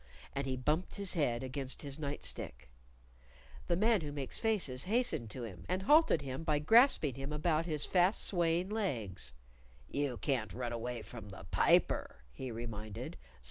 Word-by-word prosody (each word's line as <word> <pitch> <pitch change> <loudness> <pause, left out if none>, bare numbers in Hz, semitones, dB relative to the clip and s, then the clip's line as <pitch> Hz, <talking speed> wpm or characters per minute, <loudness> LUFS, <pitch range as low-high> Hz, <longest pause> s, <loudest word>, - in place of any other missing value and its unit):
And 135 0 -2
he 130 -1 -1
bumped 150 +8 0
his 200 -2 -1
head 125 -7 +1
against 130 +1 -4
his 140 +1 -4
night 140 - -4
stick. 60 0 -4 1.0
The 170 - +2
Man 215 +2 +3
Who 150 -2 -4
Makes 140 -3 -3
Faces 185 - +1
hastened 215 - 0
to 120 +3 -6
him, 90 -6 -8
and 185 +1 0
halted 295 - +5
him 135 +2 -4
by 155 -2 +2
grasping 190 - +5
him 135 +3 -5
about 155 +2 +1
his 155 -3 0
fast 185 +3 +3
swaying 175 0 +2
legs. 110 - -2 0.5
"You 140 -4 -1
can't 120 -8 -1
run 120 -1 -3
away 120 0 -4
from 110 -4 -9
the 100 - -10
Piper," - - +2
he 130 - -6
reminded. 110 -3 -6
140 Hz, 165 wpm, -34 LUFS, 120-175 Hz, 1.0 s, halted